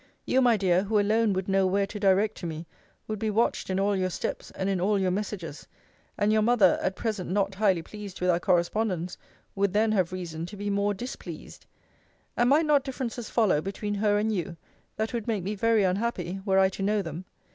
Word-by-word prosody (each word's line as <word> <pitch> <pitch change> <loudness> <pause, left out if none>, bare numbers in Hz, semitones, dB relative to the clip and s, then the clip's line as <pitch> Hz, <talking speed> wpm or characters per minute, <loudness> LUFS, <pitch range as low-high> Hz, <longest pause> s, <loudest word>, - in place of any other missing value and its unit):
You, 260 - +3
my 240 -3 +4
dear, 185 -2 +2
who 210 +1 +2
alone 215 +2 +2
would 190 0 -2
know 195 -1 +3
where 200 +2 +1
to 205 +1 -7
direct 200 +2 +3
to 175 - -4
me, 160 +1 -6 0.4
would 215 -1 -4
be 220 - -1
watched 215 0 0
in 190 0 0
all 200 +1 +2
your 185 -1 0
steps, - - -4
and 190 - -2
in 195 -2 0
all 205 +2 +2
your 190 -2 +1
messages; 185 -6 -5 0.5
and 210 +1 +2
your 215 - +3
mother, 215 -5 +4
at 190 - -1
present 215 -6 -3
not 195 +1 0
highly 190 -4 +2
pleased 205 -1 -9
with 180 0 +2
our 170 - +1
correspondence, 180 0 0 0.4
would 200 -1 0
then 215 +1 +3
have 185 -5 +1
reason 170 -3 -5
to 205 - -10
be 205 +1 -2
more 200 +1 +1
displeased: 245 +7 -8 0.7
And 240 +1 +3
might 305 +4 +4
not 290 -3 +3
differences 250 -4 -5
follow 205 -10 +2
between 200 +3 -4
her 205 0 +2
and 215 +1 0
you, 175 -3 -3 0.4
that 220 +3 -2
would 235 -2 -3
make 215 -5 -1
me 200 +3 -2
very 220 +1 +2
unhappy, 190 -1 -1
were 190 0 +3
I 190 0 +5
to 195 - -8
know 205 +1 +1
them? 165 +2 -6
200 Hz, 215 wpm, -27 LUFS, 185-215 Hz, 0.7 s, I